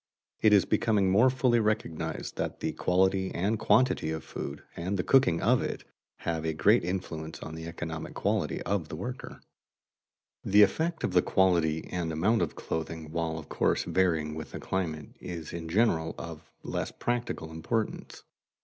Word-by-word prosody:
It 110 Hz, -, +5 dB
is 100 Hz, -2 st, +6 dB
becoming 105 Hz, -3 st, +2 dB
more 110 Hz, +7 st, +6 dB
fully 125 Hz, -2 st, +2 dB
recognized 110 Hz, -7 st, -2 dB
that -, -, -3 dB
the 80 Hz, -, -1 dB
quality 95 Hz, +3 st, +2 dB
and 100 Hz, +5 st, 0 dB
quantity 115 Hz, -5 st, +3 dB
of 80 Hz, 0 st, -3 dB
food, 70 Hz, +1 st, -6 dB
and 95 Hz, +4 st, -2 dB
the 90 Hz, -, 0 dB
cooking 130 Hz, -11 st, +4 dB
of -, -, +4 dB
it, -, -, -4 dB, 0.4 s
have 80 Hz, -1 st, -2 dB
a 80 Hz, 0 st, -1 dB
great 80 Hz, -, +4 dB
influence 85 Hz, -3 st, -4 dB
on 80 Hz, -, -7 dB
the 80 Hz, 0 st, -6 dB
economic 80 Hz, -1 st, -6 dB
quality -, -, 0 dB
of 95 Hz, -6 st, -1 dB
the -, -, -5 dB
worker. 125 Hz, +10 st, -5 dB
[Sidenote: -, -, -10 dB, 1.1 s
Clothing] -, -, -5 dB
The 105 Hz, 0 st, +9 dB
effect 160 Hz, -, 0 dB
of 90 Hz, -, 0 dB
the 90 Hz, -, +6 dB
quality 85 Hz, -5 st, +2 dB
and 85 Hz, -2 st, -2 dB
amount 100 Hz, +9 st, +2 dB
of -, -, -1 dB
clothing, 80 Hz, -1 st, -4 dB
while 80 Hz, -1 st, -2 dB
of 80 Hz, -, -8 dB
course -, -, +1 dB
varying 80 Hz, -5 st, +1 dB
with 80 Hz, -1 st, -7 dB
the -, -, -5 dB
climate, 80 Hz, -5 st, -3 dB
is 85 Hz, -3 st, -7 dB
in 85 Hz, -1 st, -5 dB
general 80 Hz, -5 st, +2 dB
of 80 Hz, -1 st, -8 dB
less -, -, -3 dB
practical 120 Hz, -9 st, -3 dB
importance. 105 Hz, +8 st, -3 dB
90 Hz, 175 wpm, -29 LUFS, 80-105 Hz, 1.1 s, The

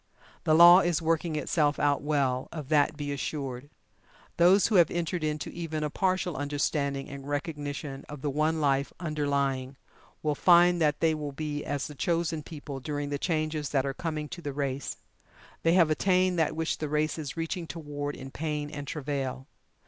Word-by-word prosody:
The 155 Hz, -, +4 dB
Law 175 Hz, +2 st, +10 dB
is 175 Hz, -4 st, +1 dB
working 165 Hz, 0 st, 0 dB
itself 150 Hz, -1 st, +1 dB
out 145 Hz, -1 st, +2 dB
well 140 Hz, -4 st, 0 dB
of 150 Hz, -5 st, -7 dB
that 150 Hz, 0 st, +3 dB
be 145 Hz, -1 st, -3 dB
assured. 140 Hz, -2 st, -4 dB, 0.7 s
Those 180 Hz, +3 st, +6 dB
who 225 Hz, -, 0 dB
have 170 Hz, -3 st, +6 dB
entered 175 Hz, 0 st, -2 dB
into 155 Hz, -1 st, -2 dB
even 160 Hz, -2 st, -4 dB
a 150 Hz, -, -2 dB
partial 185 Hz, -2 st, 0 dB
understanding 140 Hz, 0 st, -1 dB
and 140 Hz, 0 st, -8 dB
recognition 145 Hz, -2 st, -4 dB
of 145 Hz, -2 st, -8 dB
the 145 Hz, -, 0 dB
One 155 Hz, +3 st, +1 dB
Life 140 Hz, -2 st, +1 dB
underlying, 140 Hz, -4 st, -1 dB, 0.5 s
will 150 Hz, -1 st, +1 dB
find 175 Hz, +2 st, +5 dB
that 150 Hz, -2 st, +2 dB
they 160 Hz, -1 st, +4 dB
will 150 Hz, -2 st, -4 dB
be 145 Hz, 0 st, -4 dB
as 145 Hz, -1 st, -2 dB
the 150 Hz, -, -7 dB
chosen 165 Hz, +1 st, -1 dB
people 145 Hz, -3 st, -8 dB
during 145 Hz, +1 st, -3 dB
the 145 Hz, -1 st, -2 dB
changes 155 Hz, -3 st, -1 dB
that 135 Hz, -2 st, +1 dB
are 135 Hz, -, -2 dB
coming 155 Hz, +1 st, -4 dB
to 175 Hz, -, -7 dB
the 145 Hz, -3 st, -4 dB
race. 140 Hz, -1 st, -3 dB, 0.6 s
They 165 Hz, -, +3 dB
have 170 Hz, -4 st, +5 dB
attained 185 Hz, +1 st, +2 dB
that 160 Hz, -, +1 dB
which 160 Hz, 0 st, -1 dB
the 155 Hz, -, -3 dB
race 155 Hz, +2 st, 0 dB
is 150 Hz, +1 st, -6 dB
reaching 165 Hz, +1 st, -3 dB
toward 145 Hz, -3 st, -5 dB
in 135 Hz, 0 st, -9 dB
pain 150 Hz, -1 st, -3 dB
and 145 Hz, -2 st, -6 dB
travail. 135 Hz, -3 st, -3 dB
150 Hz, 180 wpm, -28 LUFS, 145-165 Hz, 0.7 s, Law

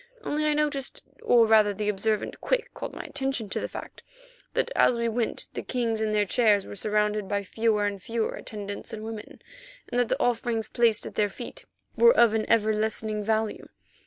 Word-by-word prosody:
Only 305 Hz, +1 st, -1 dB
I 300 Hz, -, +3 dB
noticed, 295 Hz, -3 st, -1 dB, 0.2 s
or 235 Hz, -2 st, +5 dB
rather 215 Hz, -2 st, +4 dB
the 210 Hz, +1 st, -3 dB
observant 210 Hz, +1 st, -1 dB
Quick -, -, -1 dB
called -, -, -6 dB
my -, -, -6 dB
attention 265 Hz, -6 st, -3 dB
to -, -, -2 dB
the -, -, -3 dB
fact, -, -, -9 dB, 0.5 s
that 475 Hz, -, +1 dB
as 245 Hz, -, +4 dB
we 235 Hz, 0 st, 0 dB
went 230 Hz, 0 st, -1 dB
the -, -, -3 dB
kings 230 Hz, -3 st, -1 dB
in 215 Hz, -1 st, 0 dB
their 210 Hz, -1 st, +2 dB
chairs 205 Hz, -1 st, +3 dB
were -, -, -8 dB
surrounded 210 Hz, 0 st, 0 dB
by 200 Hz, +1 st, -1 dB
fewer 215 Hz, +1 st, +1 dB
and 200 Hz, -1 st, -3 dB
fewer 225 Hz, +2 st, -1 dB
attendants 205 Hz, -2 st, -7 dB
and 215 Hz, -1 st, -6 dB
women, 220 Hz, -1 st, -8 dB, 0.5 s
and 245 Hz, -, +1 dB
that 245 Hz, -, +2 dB
the -, -, 0 dB
offerings 235 Hz, -2 st, 0 dB
placed 230 Hz, -3 st, +2 dB
at -, -, -7 dB
their 210 Hz, -1 st, +1 dB
feet -, -, -9 dB, 0.3 s
were 475 Hz, +1 st, +6 dB
of 230 Hz, -2 st, +6 dB
an 220 Hz, -1 st, -1 dB
ever 220 Hz, -1 st, +3 dB
lessening 215 Hz, 0 st, -1 dB
value. 220 Hz, 0 st, -1 dB
220 Hz, 195 wpm, -27 LUFS, 210-235 Hz, 0.5 s, were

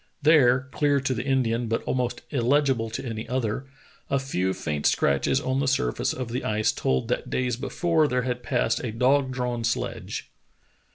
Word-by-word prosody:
There, 135 Hz, -5 st, +5 dB
clear 145 Hz, -1 st, +2 dB
to 135 Hz, -1 st, -1 dB
the 115 Hz, -, -3 dB
Indian 125 Hz, -3 st, +1 dB
but 115 Hz, +1 st, -1 dB
almost 125 Hz, -2 st, -1 dB
illegible 130 Hz, -3 st, +2 dB
to 110 Hz, -, -5 dB
any 115 Hz, -1 st, -5 dB
other, 125 Hz, 0 st, -2 dB, 0.4 s
a 140 Hz, -, +2 dB
few 95 Hz, -9 st, -1 dB
faint 75 Hz, -5 st, -1 dB
scratches 70 Hz, -1 st, +2 dB
on 130 Hz, +1 st, -1 dB
the 140 Hz, -, 0 dB
surface 95 Hz, -, +1 dB
of 130 Hz, -2 st, -4 dB
the 125 Hz, +3 st, -3 dB
ice 110 Hz, 0 st, +1 dB
told 65 Hz, -1 st, -1 dB
that -, -, -1 dB
days 125 Hz, -2 st, 0 dB
before 160 Hz, +5 st, +1 dB
there 125 Hz, -2 st, 0 dB
had 125 Hz, -1 st, -2 dB
passed 120 Hz, -3 st, 0 dB
a 120 Hz, -, -2 dB
dog 130 Hz, +4 st, +2 dB
drawn 125 Hz, -2 st, -2 dB
sledge. 115 Hz, -4 st, -3 dB
125 Hz, 175 wpm, -25 LUFS, 115-135 Hz, 0.4 s, There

